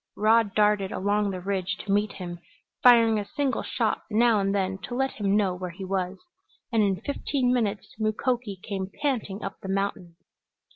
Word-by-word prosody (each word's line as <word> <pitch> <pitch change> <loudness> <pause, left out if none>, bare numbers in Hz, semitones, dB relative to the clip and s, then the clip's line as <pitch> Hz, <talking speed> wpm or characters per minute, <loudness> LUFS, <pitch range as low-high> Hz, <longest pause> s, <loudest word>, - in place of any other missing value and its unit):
Rod 220 -1 +3
darted 210 -2 +3
along 205 +1 +1
the 185 -1 -4
ridge 190 0 -2
to 200 - -4
meet 205 0 +1
him, 175 -2 -7 0.4
firing 230 -3 +6
a 205 - -4
single 280 -3 0
shot - - -1
now 230 0 +4
and 195 0 0
then 190 -1 -1
to 245 - -6
let 270 +1 +1
him 205 -1 +1
know 195 -3 +2
where 180 0 -5
he 185 +3 -8
was, 185 0 -2 0.5
and 225 -2 +3
in 195 -2 +1
fifteen 270 -2 0
minutes 215 -5 -1
Mukoki 215 0 -1
came 195 -2 -4
panting 225 -8 -1
up 195 - -5
the 190 - -7
mountain. 195 -3 -2
205 Hz, 180 wpm, -26 LUFS, 190-225 Hz, 0.5 s, firing